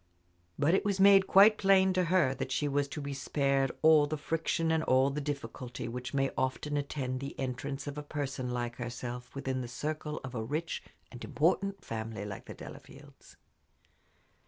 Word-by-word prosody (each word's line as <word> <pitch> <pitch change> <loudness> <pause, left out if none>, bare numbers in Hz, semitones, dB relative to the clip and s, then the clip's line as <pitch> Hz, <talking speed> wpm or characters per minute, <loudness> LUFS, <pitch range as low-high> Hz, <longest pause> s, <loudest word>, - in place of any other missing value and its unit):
But 145 +4 +3
it 190 - +3
was 200 -2 0
made 195 0 +7
quite 210 +3 +7
plain 190 -1 +4
to 185 -1 +2
her 170 -6 +3
that 135 - -5
she 145 +3 0
was 140 0 0
to 150 +2 -6
be 140 0 -4
spared 135 0 0
all 155 -2 +6
the 155 +1 -3
friction 165 +2 -1
and 160 -1 +2
all 130 +2 +4
the 150 +2 -3
difficulty 130 -3 -5
which 125 +2 -5
may 135 -1 +1
often 130 +3 -1
attend 135 -3 -2
the 140 +1 -7
entrance 135 +1 -4
of 145 0 -5
a - - -4
person 140 -4 -4
like 120 -1 -3
herself 125 +1 -6
within 130 -1 -2
the 125 - -5
circle 150 +4 -4
of 130 -1 -7
a 115 - -2
rich 150 +8 -3 0.3
and 120 - -9
important 195 +5 0
family 110 -2 -5
like 100 -2 -7
the - - -9
Delafields. - - -13
140 Hz, 180 wpm, -31 LUFS, 130-155 Hz, 0.3 s, made